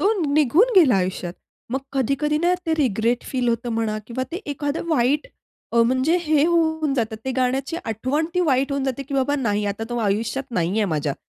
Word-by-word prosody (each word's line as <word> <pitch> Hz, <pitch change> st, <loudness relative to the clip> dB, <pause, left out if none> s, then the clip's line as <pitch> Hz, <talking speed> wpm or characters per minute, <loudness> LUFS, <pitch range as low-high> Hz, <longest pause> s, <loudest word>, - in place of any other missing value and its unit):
तो 410 Hz, +4 st, +3 dB, 0.2 s
निघून 310 Hz, -, +4 dB
गेला 275 Hz, -, +6 dB
आयुष्यात 180 Hz, -1 st, -2 dB, 0.4 s
मग 265 Hz, -, 0 dB
कधी-कधी 275 Hz, +3 st, 0 dB
ना 350 Hz, +2 st, +2 dB
ते 320 Hz, -, +2 dB
रिग्रेट 240 Hz, -4 st, +1 dB
फील 250 Hz, -2 st, 0 dB
होतं 235 Hz, +1 st, -1 dB
म्हणा 215 Hz, -1 st, -1 dB
किंवा 245 Hz, +2 st, -3 dB
ते -, -, -2 dB, 0.2 s
एखादं 290 Hz, +4 st, -3 dB
वाईट 290 Hz, 0 st, +2 dB, 0.5 s
अ, 235 Hz, 0 st, +5 dB
म्हणजे 260 Hz, +8 st, +2 dB
हे 305 Hz, -3 st, +3 dB
होऊन 315 Hz, -4 st, +1 dB
जातं 225 Hz, -4 st, -1 dB
ते 265 Hz, -, -1 dB
गाण्याची 260 Hz, +5 st, 0 dB
आठवण 255 Hz, +8 st, -1 dB
ती 360 Hz, -, +2 dB
वाईट 270 Hz, +1 st, +2 dB
होऊन 275 Hz, -1 st, -1 dB
जाते 265 Hz, +1 st, -2 dB
की 275 Hz, +1 st, -7 dB
बाबा 275 Hz, +2 st, +1 dB
नाही 210 Hz, -6 st, 0 dB
आता 205 Hz, +2 st, -3 dB
तो 240 Hz, -, -2 dB
आयुष्यात 225 Hz, +6 st, -1 dB
नाहीये 185 Hz, +5 st, +1 dB
माझ्या. 145 Hz, -2 st, -1 dB
260 Hz, 190 wpm, -22 LUFS, 230-300 Hz, 0.5 s, गेला